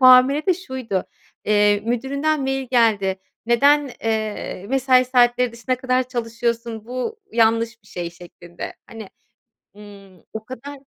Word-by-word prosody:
muamele 255 +5 +6
de 370 - +4
şuydu. 260 - -4 0.4
Eee, 205 -1 +3
müdüründen 280 +6 0
mail 270 -1 -2
geldi. 205 -6 +2 0.3
Neden, 280 +4 +4
eee, 215 -3 -2
mesai 260 0 +4
saatleri 245 -1 +3
dışına 240 +2 -2
kadar 255 0 0
çalışıyorsun, 230 -2 -3
bu 255 - -4
yanlış 230 0 +2
bir - - -25
şey 175 -1 -5
şeklinde. 175 0 -10
Hani, 220 -3 -10 0.7
ımm, 200 -3 -14
o 220 0 -6
kadar 280 +3 -8
235 Hz, 125 wpm, -21 LUFS, 215-260 Hz, 0.7 s, muamele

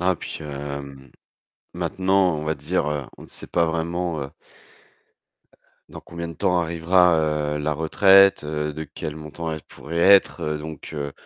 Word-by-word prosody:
Ah 90 -1 +2
puis, - - -7
hem, 70 -2 -7 0.6
maintenant, 95 0 +1
on 75 - -5
va 80 - 0
dire, 75 - -1
heu, 70 -3 -3
on - - -12
sait - - -9
pas 85 -1 +1
vraiment, 85 0 -2
heu 70 - -7 1.6
dans - - -10
combien 85 0 -7
de - - -6
temps 90 -1 +1
arrivera, 85 +1 +3 0.4
heu, - - -3
la 75 +1 -1
retraite, 95 +6 +5
heu? 75 0 -3
De 80 +1 -6
quel 75 - -7
montant 80 +1 -6
elle 80 -1 -6
pourrait 85 +3 -7
être, 95 +3 +5
heu? 75 0 -2
Donc, 80 -1 -8
heu, 70 -1 -4
80 Hz, 165 wpm, -23 LUFS, 75-85 Hz, 1.6 s, retraite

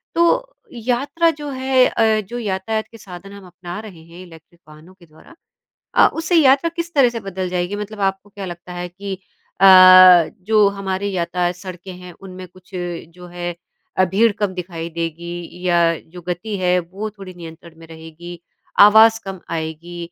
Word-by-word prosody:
तो - - +1 0.2
यात्रा 255 +8 0
जो 295 -1 -8
है 260 -1 +2
अ, 220 -1 +1
जो 240 - -6
यातायात 215 +1 -3
के 230 - -13
साधन 195 -1 -12
हम 200 -2 -12
अपना 180 +2 -9
रहे 190 -7 -12
हैं 170 +2 -13
इलेक्ट्रिक 165 0 -17
वाहनों 155 +4 -16
के 185 -2 -21
द्वारा 160 - -19 0.6
अ, - - +6
उससे 325 +2 -2
यात्रा 280 +1 +4
किस 340 0 -4
तरह 275 -4 +5
से 230 -1 -6
बदल 190 -2 -5
जाएगी 180 +2 -3
मतलब 210 0 -7
आपको 195 +1 -19
क्या 200 -1 -8
लगता 175 0 -9
है 175 0 -6
कि 195 +2 -7 0.5
अ, - - +4 0.8
जो 215 0 +4
हमारी 200 0 -4
यातायात 175 0 -1
सड़कें 185 0 -9
हैं 180 -1 -11
उनमें 185 -1 -10
कुछ 185 +1 -21
जो 175 0 -7
है 175 0 -6 0.4
अ, 185 - +4
भीड़ 210 +6 +2
कम 200 -3 -2
दिखाई 170 -2 -6
देगी 170 +2 -6
या 175 -1 +3 0.2
जो 175 +2 -13
गति 180 +5 -4
है 180 -1 +2
वो 195 +5 -7
थोड़ी 195 -3 -12
नियंत्रण 165 -1 -13
में 165 - -14
रहेगी 165 +2 -11 0.4
आवाज़ 220 +2 +7
कम 195 -2 -7
आएगी 165 +1 -6
185 Hz, 175 wpm, -19 LUFS, 175-215 Hz, 0.8 s, आवाज़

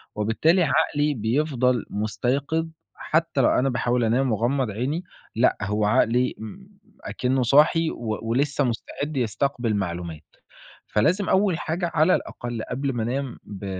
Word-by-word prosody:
وبالتالي 135 - +2
عقلي 150 -1 +1
بيفضل 125 0 0
مُستيقظ 135 +9 -1 0.3
حتّى 160 -3 0
لو - - +4
أنا 135 +2 +2
باحاول 120 -1 0
أنام 125 +3 +2
وأغمّض 120 +2 0
عيني 135 - -2 0.3
لأ، 115 +3 +3
هو 105 +2 0
عقلي 125 +2 +2
ام 110 - -9 0.4
أكنٌه 130 +1 -1
صاحي 150 +6 +4
و 110 -2 -4
ولسّه 140 +4 +1
مستعد 140 +4 -3
يستقبل 120 -1 -1
معلومات. 85 -4 -4 0.7
فلازم 180 - +1
أول 190 -3 +2
حاجة 170 +1 -2
على 160 +4 +4
الأقل 120 -2 -5
قبل 135 +1 -2
ما 115 -2 -2
أنام 130 +2 -3
ب 100 -1 -9
125 Hz, 135 wpm, -24 LUFS, 110-150 Hz, 0.7 s, لو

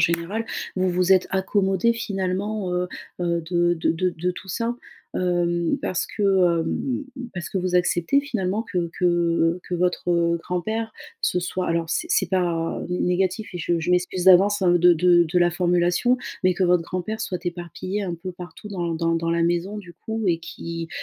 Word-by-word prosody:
générale 170 +7 0 0.3
vous 185 0 +2
vous 180 +1 +1
êtes 185 - +4
accommodés 195 +3 +2
finalement, 195 -2 -2
heu, 180 0 0 0.3
heu, 170 -1 0
de 175 -1 +3
de 160 - 0
de 180 +2 0
de 175 +2 -2
tout 190 +1 -9
ça. 230 +5 -2 0.4
Hem, 175 -2 +1
parce 185 - -1
que, 210 - -5
hem, 185 - +2 0.3
parce 175 -4 -5
que - - -4
vous 180 -1 -1
acceptez 175 +8 +3
finalement 215 -6 -2
que 175 -6 -2
que 170 -1 +2
que 180 - -3
votre, 180 0 0
heu, 170 0 +2
grand-père 220 +7 -3 0.3
se 180 - +1
soit 180 +1 -2
alors 165 0 0
c 165 - -1
c'est 190 - +2
pas, 175 -3 0
heu, - - -5
n 180 - 0
négatif 190 +4 0
et - - -3
je 170 0 0
je 170 - -1
m'excuse 180 0 +1
d'avance, 195 +2 +6
hein, 180 -2 +4
de 175 0 +6
de 175 +1 +5
de 175 +3 +1
la 175 0 +4
formulation. 175 +7 +2 0.3
Mais 185 - +5
que 185 - -2
votre 180 -1 +4
grand-père 185 +6 -4
soit 180 -4 -4
éparpillé 175 +3 -4
un 175 -3 -3
peu 180 +2 -7
partout 175 +3 -10
dans 175 -4 -2
dans 165 0 0
dans 165 0 -1
la 170 0 +1
maison 175 +5 0
du 175 -4 -11
coup 220 -1 -4
et 170 -3 +2
qui, 165 0 -6
180 Hz, 190 wpm, -23 LUFS, 170-190 Hz, 0.4 s, d'avance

